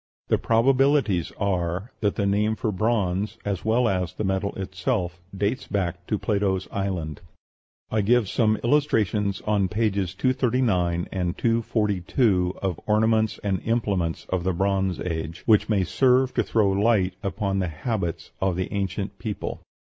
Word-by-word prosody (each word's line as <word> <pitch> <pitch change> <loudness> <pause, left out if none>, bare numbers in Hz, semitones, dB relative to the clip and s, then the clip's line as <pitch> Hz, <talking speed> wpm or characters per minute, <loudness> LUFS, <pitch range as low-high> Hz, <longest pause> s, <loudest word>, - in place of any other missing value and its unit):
The - - +3
probabilities 130 - +3
are 95 +1 -1
that 105 -2 0
the 100 - 0
name 105 +2 +1
for 110 - -1
bronze, 105 -1 0
as 100 -3 -2
well 115 +2 +2
as 90 -5 -1
the - - -3
metal 95 0 0
itself, 95 -1 -2 0.2
dates 105 +6 -1
back 90 -3 -2
to 105 - 0
Plato's 100 -3 0
island. 90 -7 -3 0.7
I 110 - +2
give 115 +1 +3
some 110 +1 +2
illustrations 110 -7 +1
on 105 -3 +1
pages 100 -3 -1
239 115 -9 +1
and 90 -2 -2
242 105 -4 +1
of 95 -4 -1
ornaments 110 0 +2
and 95 -3 0
implements 100 -8 -1
of 95 -2 -1
the 95 0 0
Bronze 95 0 0
Age, 85 -1 -4
which 110 -1 +4
may 100 -4 +2
serve 130 +6 +3
to 120 - +2
throw 105 -2 +2
light 100 -2 +2
upon 100 -1 -1
the 90 - 0
habits 85 +1 -3
of 95 -2 +1
the 95 0 -3
ancient 100 0 -3
people. 110 -3 -4
100 Hz, 150 wpm, -25 LUFS, 90-110 Hz, 0.7 s, which